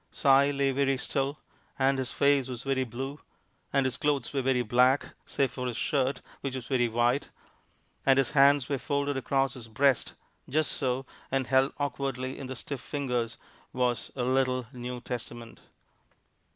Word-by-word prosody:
Si - - -3 0.2
lay 140 -1 +1
very 135 0 +1
still, 135 +3 -1 0.4
and 135 0 +2
his 130 - -2
face 140 -2 +3
was 125 -3 -6
very 135 -1 +1
blue, 135 +4 -5 0.5
and 140 -1 +2
his 130 0 -1
clothes 145 -3 0
were 135 - +1
very 130 -1 +2
black, 125 +4 +3
save 135 -2 0
for 125 -1 -4
his 120 -2 -3
shirt, 135 -1 0 0.2
which 135 -2 -4
was 130 -3 -5
very 125 -2 +2
white, 120 +4 +1 0.7
and 135 -1 +5
his 135 -2 +2
hands 140 -2 +5
were 140 -2 -1
folded 140 0 -1
across 135 0 +1
his 120 -3 -9
breast, 130 +3 +2 0.3
just 155 +3 +1
so, 130 0 -1 0.2
and 135 -1 0
held 130 +2 +3
awkwardly 135 -2 -3
in 135 - -6
the 130 - -5
stiff 135 +1 -6
fingers 125 -5 -2 0.4
was 125 -2 0
a 125 - -1
little 130 0 +1
New 125 0 -6
Testament. 120 -1 -7
130 Hz, 165 wpm, -29 LUFS, 125-140 Hz, 0.7 s, and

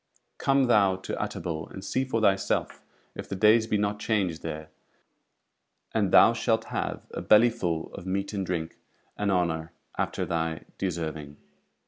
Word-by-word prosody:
Come 135 0 +3
thou 105 -6 +4
to 95 - -5
Utterbol 80 -2 -4
and 95 0 -9
see 130 - 0
for 115 -4 -1
thyself 95 -2 +1 0.3
if - - -8
the - - -3
days 110 +3 +5
be 110 - +1
not 105 0 -1
changed 95 -8 0
there; 80 -1 -6 1.2
and 105 -4 +1
thou 115 - +7
shalt 115 -1 +1
have - - -3
a - - -4
belly 115 +3 +6
full 85 -8 -3
of 90 - -8
meat 100 +2 -2
and 100 -2 -1
drink, 85 -3 -3 0.4
and 105 -1 0
honour 85 -3 0 0.3
after - - -1
thy 80 -1 -2 0.2
deserving." 80 -5 -4
95 Hz, 155 wpm, -27 LUFS, 80-110 Hz, 1.2 s, thou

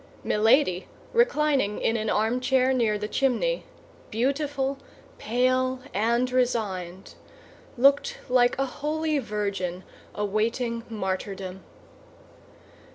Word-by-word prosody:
Milady, 215 -3 +3 0.3
reclining 300 - +2
in 225 - +1
an 215 -1 -1
armchair 255 +4 +2
near 225 -4 +1
the 210 0 -4
chimney, 275 - 0 0.4
beautiful, 275 +3 -1 0.4
pale, 255 +2 +1
and 235 +5 +1
resigned, 200 -8 -1 0.6
looked 275 +3 +4
like 250 -1 +3
a 270 - +1
holy 305 +3 -1
virgin 200 -6 -3 0.3
awaiting 230 +3 -1
martyrdom. 190 -2 -4
240 Hz, 90 wpm, -26 LUFS, 210-265 Hz, 0.6 s, looked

